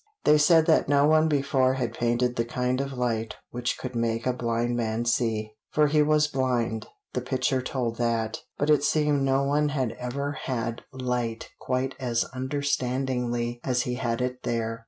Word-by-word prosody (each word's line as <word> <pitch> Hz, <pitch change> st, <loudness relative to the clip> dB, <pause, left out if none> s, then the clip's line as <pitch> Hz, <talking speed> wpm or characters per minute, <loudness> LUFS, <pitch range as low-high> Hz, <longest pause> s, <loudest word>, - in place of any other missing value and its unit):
They 150 Hz, 0 st, +5 dB
said 160 Hz, +1 st, +5 dB
that 160 Hz, -4 st, +3 dB
no 140 Hz, 0 st, +5 dB
one 155 Hz, +1 st, +4 dB
before 135 Hz, -3 st, +2 dB
had 120 Hz, -4 st, -2 dB
painted 120 Hz, +1 st, 0 dB
the 115 Hz, -, +1 dB
kind 125 Hz, +2 st, -1 dB
of 140 Hz, 0 st, -4 dB
light 115 Hz, -3 st, -1 dB, 0.2 s
which 120 Hz, 0 st, -2 dB
could 130 Hz, -1 st, -6 dB
make 115 Hz, 0 st, -1 dB
a 125 Hz, -, +2 dB
blind 120 Hz, 0 st, -1 dB
man 115 Hz, 0 st, -1 dB
see. 110 Hz, -3 st, 0 dB, 0.2 s
For 150 Hz, -, +3 dB
he 150 Hz, +1 st, +3 dB
was 150 Hz, 0 st, +4 dB
blind 120 Hz, -5 st, -1 dB, 0.3 s
the 125 Hz, -, -1 dB
picture 130 Hz, +1 st, 0 dB
told 125 Hz, -3 st, -2 dB
that, 115 Hz, -2 st, 0 dB, 0.2 s
but 145 Hz, +1 st, +2 dB
it 150 Hz, -1 st, +4 dB
seemed 150 Hz, -2 st, +2 dB
no 135 Hz, 0 st, +2 dB
one 145 Hz, +2 st, +2 dB
had 130 Hz, -5 st, -1 dB
ever 140 Hz, +3 st, -3 dB
had 115 Hz, -4 st, -3 dB
light 125 Hz, -3 st, -3 dB
quite 130 Hz, +1 st, -1 dB
as 120 Hz, -3 st, 0 dB
understandingly 130 Hz, -3 st, -1 dB
as 125 Hz, -2 st, +1 dB
he 125 Hz, -, -2 dB
had 120 Hz, -1 st, -2 dB
it 125 Hz, 0 st, -2 dB
there. 115 Hz, -1 st, -2 dB
125 Hz, 175 wpm, -26 LUFS, 120-140 Hz, 0.3 s, They